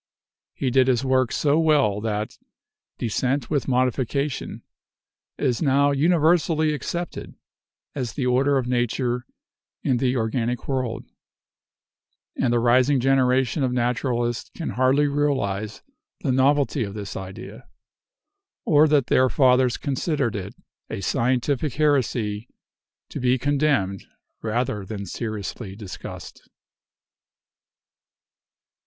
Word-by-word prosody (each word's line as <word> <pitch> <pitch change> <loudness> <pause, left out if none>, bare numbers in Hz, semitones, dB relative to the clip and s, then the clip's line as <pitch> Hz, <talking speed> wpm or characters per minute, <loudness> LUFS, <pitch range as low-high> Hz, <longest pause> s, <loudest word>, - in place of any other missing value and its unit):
He 130 - -1
did 130 0 +4
his 130 0 +2
work 130 -2 +2
so 150 +1 +2
well 145 -11 +3
that 105 -1 -3 0.6
"descent 130 +5 -1
with 145 -3 0
modification" 130 +2 -1 0.7
is 125 -2 0
now 140 -1 +3
universally 160 +1 +2
accepted 170 +4 -5 0.6
as 125 -5 -4
the 135 - -2
order 135 +3 +3
of 130 - -1
nature 125 0 -1 0.6
in 130 - +2
the 125 +1 +1
organic 120 +1 -2
world; 125 -4 -2 1.3
and 125 - +1
the 120 - +3
rising 125 +4 +3
generation 130 +1 +2
of 130 -2 +1
naturalists 120 -1 -1
can 165 - -4
hardly 130 +3 +3
realize 130 -8 -1 0.4
the 140 - 0
novelty 135 0 +2
of 100 -1 -6
this 100 -2 -6
idea, 95 0 -9 1.0
or 150 +1 +5
that 145 -4 +3
their 130 0 +3
fathers 125 -2 +3
considered 140 -4 -1
it 100 -1 -6 0.3
a - - -5
scientific 130 +6 0
heresy 125 -7 0 0.6
to - - -6
be 125 +1 +2
condemned 140 -8 0 0.3
rather 110 -2 -1
than 100 +1 -6
seriously 105 0 -5
discussed. 100 -3 -9
130 Hz, 110 wpm, -23 LUFS, 115-140 Hz, 1.3 s, or